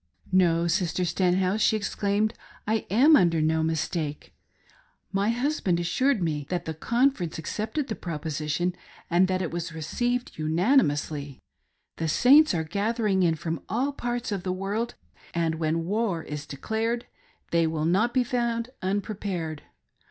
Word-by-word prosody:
"No, 170 -3 +3
Sister 180 0 0
Stenhouse," 185 +3 +1
she 220 - +4
exclaimed, 205 +1 0 0.3
"I 220 0 -1
am 270 - +6
under 170 - +4
no 160 +1 +2
mistake. 160 -1 -2 0.8
My 200 +2 +1
husband 240 - 0
assured 230 +6 +1
me 150 -4 -2
that 175 -1 -2
the 160 - -3
conference 235 - 0
accepted 220 - -3
the 220 - -2
proposition, 155 0 -2 0.4
and 180 +2 +4
that 185 0 0
it 170 - -3
was 170 0 -4
received 240 - -2
unanimously. 155 - +1 0.6
The 165 - -1
Saints 270 - +6
are 160 - 0
gathering 200 +3 0
in 165 -3 +3
from 160 -1 -4
all 250 +8 0
parts 240 -2 -3
of 200 -3 -2
the 185 - -2
world, 200 +5 -2 0.4
and 165 -1 0
when 165 +1 0
war 200 -4 -1
is 150 -1 -6
declared 225 - -2 0.5
they 170 -1 +3
will 160 -1 -1
not 195 +8 +2
be 255 0 +2
found 235 0 -1
unprepared. 190 -5 -3
185 Hz, 145 wpm, -26 LUFS, 160-225 Hz, 0.8 s, am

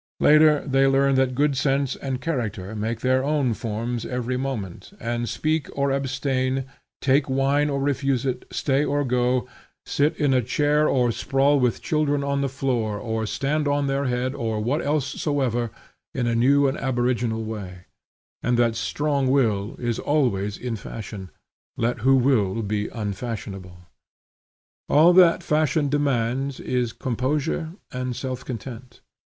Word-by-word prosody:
Later 150 -1 +5
they 135 0 +3
learn 135 0 +3
that 130 -1 +2
good 145 0 +2
sense 135 0 +1
and 135 -2 -4
character 110 - -3
make 110 +2 -3
their 130 0 +2
own 140 -4 +1
forms 115 +2 -3
every 125 0 -3
moment, 125 - -5
and 120 0 -2
speak 155 -1 -1
or 140 0 +1
abstain, 135 -1 -1 0.4
take 135 +1 +2
wine 140 +2 +2
or 140 -1 -1
refuse 135 -2 0
it, 125 -1 -2
stay 140 0 +1
or 145 0 0
go, 125 0 +1 0.4
sit 150 +3 +1
in 145 -3 +2
a 130 - +3
chair 150 +5 +2
or 125 -3 +2
sprawl 140 +4 +2
with 125 -3 0
children 150 -3 +1
on 140 0 0
the 140 - 0
floor, 125 -5 -1
or 110 0 -3
stand 145 +6 -1
on 145 0 +1
their 135 0 0
head, 125 +1 -1
or 115 -6 -2
what 130 +9 0
else 145 -1 +1 0.2
soever, 125 -6 0 0.5
in 125 -2 0
a 120 - +1
new 140 +4 +4
and 135 - -2
aboriginal 120 -3 0
way; 95 -5 -7 0.6
and 120 0 +1
that 120 -1 +2
strong 140 +6 0
will 110 -7 +1
is 120 -2 -2
always 105 -9 0
in 125 -2 -4
fashion, 105 -3 -8 0.5
let 120 +1 0
who 135 +5 +4
will 115 -5 +2
be 105 0 -1
unfashionable. 100 -4 -5 1.1
All 160 +4 +6
that 175 -2 +6
fashion 155 -1 +1
demands 135 -1 0
is 125 -2 -1
composure 140 +7 -2 0.2
and 125 -1 -3
self 130 0 -4
content. 125 0 -8
130 Hz, 150 wpm, -24 LUFS, 115-140 Hz, 1.1 s, All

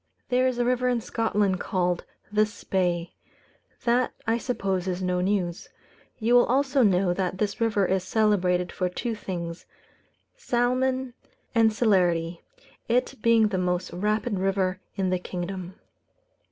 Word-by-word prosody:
There 255 +1 +3
is 255 -2 -1
a 245 - +1
river 250 0 +1
in 245 -1 +1
Scotland 210 -4 0
called 180 -1 -1 0.3
the 210 0 +3
Spey; 180 -5 -2 0.7
that 245 +1 +2
I 230 +1 +1
suppose 195 -7 -2
is 180 -1 -1
no 180 0 0
news. 180 -2 -1 0.5
You 230 +1 +1
will 245 0 +6
also 270 +2 +2
know 190 -4 +3
that 185 0 -2
this 205 +2 -2
river 215 -4 +2
is 190 0 0
celebrated 185 -4 +1
for 180 -1 -1
two 230 +6 -3
things 170 -5 -6 0.7
salmon 255 - 0 0.4
and 225 -2 +4
celerity, 175 -7 +1 0.5
it 250 +3 +1
being 225 -2 +4
the 190 -3 -1
most 180 -1 -1
rapid 210 +3 -1
river 190 -1 0 0.2
in 190 -2 0
the 185 - +1
kingdom. 180 0 -5
200 Hz, 140 wpm, -26 LUFS, 180-235 Hz, 0.7 s, will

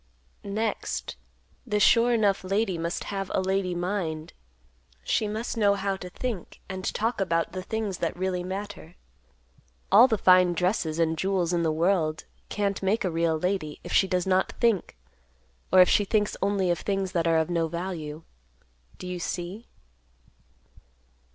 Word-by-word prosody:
"Next, 210 - -3 0.5
the 210 - -1
'sure 230 +3 +5
enough' 205 -5 +2
lady 195 0 0
must 170 +1 -3
have 195 -1 -3
a - - +2
lady 190 -1 0
mind. 175 -4 -3 0.7
She 215 - 0
must 220 +3 -4
know 205 -2 +4
how 195 0 -1
to 180 - -8
think 225 -2 -5
and 190 -1 -6
talk 225 0 -1
about 165 -3 0
the 185 - -5
things 210 -1 -3
that 170 +1 -2
really 185 -1 -1
matter. 190 -2 -6 1.0
All 225 +6 +8
the 220 -4 +1
fine 185 -2 +5
dresses 175 -2 0
and 160 -1 +1
jewels 185 -2 0
in 170 - +1
the 160 -1 +1
world 160 -1 +1 0.2
can't 200 -1 -1
make 200 +3 +1
a 180 - 0
real 165 -1 +1
lady, 180 -3 -2
if - - -6
she 190 - +4
does 180 -1 0
not 190 0 +1
think, 225 - +1 0.7
or 185 - +8
if 180 - +7
she 205 - +4
thinks 210 +1 0
only 195 -2 +1
of 175 - -1
things 195 -2 -2
that 170 -3 0
are 165 -1 +3
of 160 +2 0
no 165 -1 +1
value. 165 -2 -5 0.7
Do - - -9
you 180 -1 -4
see?" 180 +6 -5
185 Hz, 165 wpm, -26 LUFS, 170-200 Hz, 1.0 s, All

